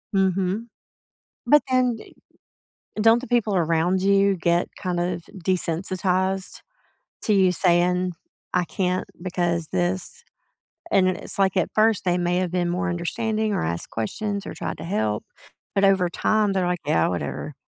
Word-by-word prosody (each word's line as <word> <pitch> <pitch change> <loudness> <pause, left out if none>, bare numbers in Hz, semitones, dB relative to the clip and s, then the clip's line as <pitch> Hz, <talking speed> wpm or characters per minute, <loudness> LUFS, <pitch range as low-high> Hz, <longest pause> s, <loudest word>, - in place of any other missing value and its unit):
Mhm. 190 +3 +1 0.8
But 295 0 +6
then, 250 -2 +2
d - - -14 0.9
don't 225 +2 +5
the 260 - -9
people 230 -4 +1
around 170 +2 +1
you 195 0 +3
get 170 0 +1
kind 180 -2 -3
of 175 0 -1 0.2
desensitized, 185 +2 -1 0.6
to 215 - +2
you 190 -2 +4
saying, 180 0 +2 0.4
"I 180 - +2
can't 180 +1 -1
because 175 -3 -1
'this'"? 185 - -2 0.7
And 190 -2 +4
then 185 - +1
it's, - - -8
like, 195 -1 +2
at 185 - +1
first, 220 -1 +3
they 180 0 +2
may 175 0 0
have 180 -2 -1
been 175 -1 0
more 180 +2 -1
understanding, 215 +5 -1
or - - 0
asked 85 +1 -3
questions, 200 - -3
or - - -5
tried - - -4
to - - -6
help, 110 - -1 0.5
but 200 0 +3
over 190 -2 +4
time, 210 +2 +1
they're 185 -2 0
like, 180 -1 -1
"Yeah, 80 - +2
whatever." 90 - -4
185 Hz, 155 wpm, -24 LUFS, 175-200 Hz, 0.9 s, But